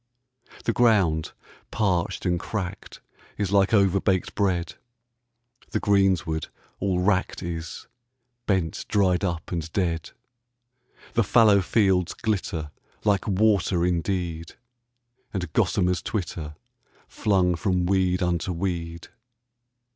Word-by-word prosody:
The 115 - 0
ground 100 -11 +3 0.4
parched 95 -5 -1
and 90 -1 +1
cracked 95 0 -5 0.4
is 100 -2 -1
like 100 -1 +3
overbaked 95 -2 +2
bread, 90 -5 0 1.0
The 110 - -1
greensward 95 -6 +1 0.3
all 95 -2 0
wracked 95 -1 0
is, 85 -2 -5 0.6
bent 95 -6 -1
dried 95 -2 +2
up 85 -4 -3
and 85 -2 -3
dead. 85 -4 -1 1.0
The 115 - +3
fallow 105 -2 +5
fields 95 -3 +2
glitter 90 -8 -2 0.3
like 100 -2 +1
water 100 -3 +2
indeed, 85 -2 -2 0.8
And 90 -5 -3
gossamers 90 -2 +1
twitter, 80 -7 -4 0.5
flung 95 -4 +1
from 90 0 0
weed 95 -1 +1
unto 90 0 -1
weed. 85 -2 -4
90 Hz, 100 wpm, -25 LUFS, 85-100 Hz, 1.0 s, fallow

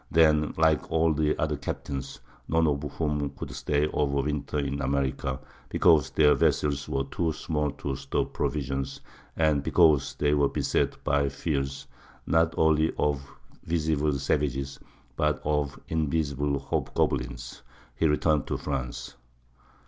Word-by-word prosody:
Then, 75 -2 +4
like 80 -2 +2
all 80 0 +3
the 75 0 +1
other - - 0
captains, 70 -1 -5 0.3
none 80 0 +2
of 70 -2 +1
whom 75 -2 -1
could - - -6
stay 75 0 0
over 70 -2 0
winter 75 0 -2
in 70 0 -2
America, 65 -1 -1 0.3
because 80 -5 +4
their 75 -1 +5
vessels 70 -2 +1
were 70 - 0
too 80 +4 -1
small 75 -2 -1
to 70 -2 -4
store 70 0 -1
provisions, 70 -2 -3 0.4
and 75 -3 +3
because 75 -2 +3
they 75 0 +1
were 70 -1 +3
beset - - -1
by 70 -1 +2
fears, 70 -1 -3 0.4
not 80 0 +2
only 80 0 +3
of 75 -2 +1 0.4
visible 80 -2 0
savages, 70 -1 -1 0.4
but 75 0 +1
of 75 -2 0
invisible 75 -3 0
hobgoblins, - - -2 0.3
he 80 - +2
returned 75 -1 +2
to - - -1
France. 65 -4 -4
75 Hz, 135 wpm, -27 LUFS, 70-80 Hz, 0.4 s, their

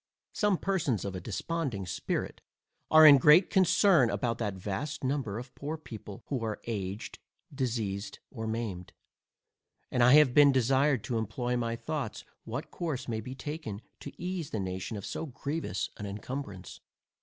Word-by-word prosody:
Some 205 -3 +2
persons 155 - 0
of 100 - -3
a 90 - -5
desponding 115 - -3
spirit 90 - -3 0.5
are 155 0 +8
in 145 -2 +10
great 150 +7 +6
concern 185 - +5
about 115 -1 -1
that 105 -4 -2
vast 105 +12 -4
number 130 -6 -1
of 125 +2 -8
poor 150 +3 -5
people, 110 -9 -10
who 130 -5 -3
are 110 -2 -3
aged, 100 -3 -4 0.3
diseased, 110 -6 -2
or 110 -3 -5
maimed; 110 -6 -4 1.0
and 125 - +1
I 125 +2 +7
have 150 -4 +7
been 145 0 +7
desired 130 0 +2
to 115 -2 -1
employ 120 +3 -2
my 115 -1 -1
thoughts 145 -2 -4 0.2
what 120 +6 -5
course 150 -8 -3
may 110 -2 -2
be 130 +4 -7
taken, 145 -7 -5 0.2
to 140 - -8
ease 180 -3 -3
the 110 - -3
nation 95 +2 -4
of 100 - -7
so 160 - -4
grievous 140 - -3
an 105 - -5
incumbrance. 100 -2 -6
125 Hz, 160 wpm, -30 LUFS, 105-150 Hz, 1.0 s, in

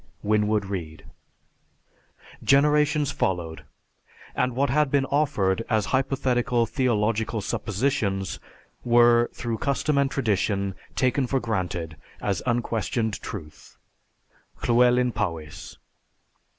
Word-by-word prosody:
_ - - -33 0.2
WINWOOD 105 0 +1
READE. 85 -5 -6 1.4
_Generations 150 +1 +3
followed 85 -4 -2 0.7
and 125 -1 0
what 140 0 +1
had 150 +1 +2
been 140 -1 +2
offered 125 -9 +1
as 110 -3 +2
hypothetical 125 -3 +1
theological 115 -2 0
suppositions 100 -3 -1 0.4
were 120 0 +5
through 115 -2 -4
custom 140 +1 0
and 140 -1 +2
tradition 100 -6 0 0.2
taken 130 +1 +1
for 135 +2 +1
granted 90 -8 -3 0.2
as 100 -4 -1
unquestioned 115 -2 -1
truth._ 75 -7 -9 0.9
LLEWELYN 125 +1 +4
POWYS. 80 -7 -5
115 Hz, 100 wpm, -25 LUFS, 100-130 Hz, 1.4 s, were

